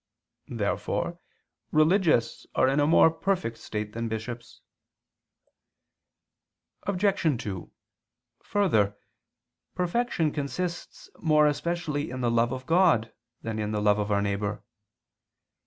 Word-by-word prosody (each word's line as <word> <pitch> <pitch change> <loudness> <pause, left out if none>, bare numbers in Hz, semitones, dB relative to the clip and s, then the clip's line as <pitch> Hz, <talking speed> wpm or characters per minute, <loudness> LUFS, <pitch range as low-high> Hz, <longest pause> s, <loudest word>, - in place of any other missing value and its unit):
Therefore - - -2 0.5
religious 155 - +2
are 130 - +4
in 135 +2 +2
a 145 - +3
more 160 0 +6
perfect 165 -11 -2
state 105 -1 -5
than 115 0 -3
bishops. 115 +1 -6 2.3
Obj. 200 0 +1 0.2
2: 95 -4 -6 0.7
Further, 110 - +1 0.8
perfection 180 -3 0
consists 170 +5 -4
more 155 -2 +4
especially 150 0 -1
in 130 +1 -5
the 120 -1 +1
love 115 +1 +2
of 130 0 -5
God 165 - +3 0.3
than 110 -1 -3
in 105 0 -2
the 105 - 0
love 105 0 +3
of 105 0 -1
our 100 0 +2
neighbor. 100 +1 -2
130 Hz, 110 wpm, -27 LUFS, 110-170 Hz, 2.3 s, more